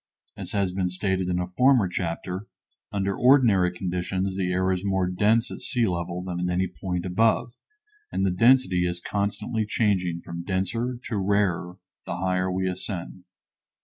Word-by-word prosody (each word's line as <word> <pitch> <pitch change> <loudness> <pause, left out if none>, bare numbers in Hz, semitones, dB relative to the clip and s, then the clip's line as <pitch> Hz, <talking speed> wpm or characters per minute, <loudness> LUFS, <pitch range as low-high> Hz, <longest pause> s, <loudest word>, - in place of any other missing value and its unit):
As - - -7
has 100 -3 +1
been 90 -1 -1
stated 95 0 -1
in 90 - 0
a 90 0 -3
former 125 -5 +5
chapter, 90 +2 -4 0.4
under 100 -1 -1
ordinary 115 -9 +5
conditions 95 +1 -2
the 95 -2 -1
air 95 +1 +1
is 90 0 -1
more 95 -2 +1
dense 105 +6 +2
at - - -7
sea 120 -3 0
level 90 -1 -2
than 90 -1 -4
at 90 0 -1
any 90 +1 +1
point 90 +1 -4
above, 115 +5 +2 0.6
and 95 - -1
the 95 - +2
density 95 -4 +4
is 85 0 -3
constantly 105 +4 -2
changing 95 -6 0
from 85 0 -7
denser 100 +7 -1
to 110 - -3
rarer 95 -3 0 0.3
the - - -3
higher 90 0 0
we 95 0 -1
ascend. 90 -1 -5
95 Hz, 165 wpm, -25 LUFS, 90-105 Hz, 0.6 s, former